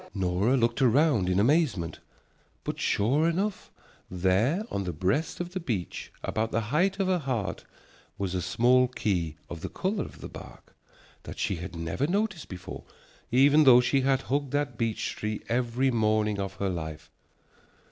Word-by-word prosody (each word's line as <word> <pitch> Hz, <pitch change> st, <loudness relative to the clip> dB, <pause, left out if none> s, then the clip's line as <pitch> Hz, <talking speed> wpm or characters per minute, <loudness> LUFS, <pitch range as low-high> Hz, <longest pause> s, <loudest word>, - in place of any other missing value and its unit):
Nora 95 Hz, +7 st, +1 dB
looked 115 Hz, +2 st, +1 dB
around 130 Hz, -, +3 dB
in 90 Hz, +1 st, +2 dB
amazement, 120 Hz, -, +1 dB, 0.6 s
but -, -, -4 dB
sure 140 Hz, +11 st, +2 dB
enough, 195 Hz, +4 st, -2 dB, 0.4 s
there 95 Hz, -, +1 dB
on 100 Hz, -, -1 dB
the 90 Hz, -2 st, -3 dB
breast 95 Hz, -, -1 dB
of 175 Hz, 0 st, -4 dB
the 185 Hz, -, -3 dB
beech, 110 Hz, -, -4 dB
about 110 Hz, +1 st, -1 dB
the -, -, +1 dB
height 190 Hz, +5 st, +2 dB
of 195 Hz, -, +2 dB
her 185 Hz, -1 st, +2 dB
heart, 115 Hz, -, -3 dB, 0.5 s
was 95 Hz, -2 st, -2 dB
a 90 Hz, -, -1 dB
small 125 Hz, +8 st, +3 dB
key 90 Hz, -10 st, -1 dB
of 85 Hz, -2 st, -8 dB
the -, -, -4 dB
color 195 Hz, +2 st, -2 dB
of -, -, -11 dB
the -, -, -6 dB
bark, -, -, -13 dB, 0.5 s
that -, -, -9 dB
she 95 Hz, -, -1 dB
had 90 Hz, +2 st, -7 dB
never 85 Hz, -, -2 dB
noticed 200 Hz, -2 st, -1 dB
before, 90 Hz, -2 st, -8 dB, 0.5 s
though 135 Hz, 0 st, +7 dB
she 135 Hz, +2 st, +2 dB
had 135 Hz, 0 st, +2 dB
hugged 140 Hz, 0 st, -1 dB
that 145 Hz, -4 st, 0 dB
beech 115 Hz, -1 st, -1 dB
tree 105 Hz, 0 st, -3 dB
every 125 Hz, +2 st, +1 dB
morning 110 Hz, -2 st, +1 dB
of 95 Hz, -1 st, -3 dB
her 100 Hz, -, -1 dB
life. 80 Hz, -2 st, -6 dB
120 Hz, 165 wpm, -28 LUFS, 95-145 Hz, 0.6 s, though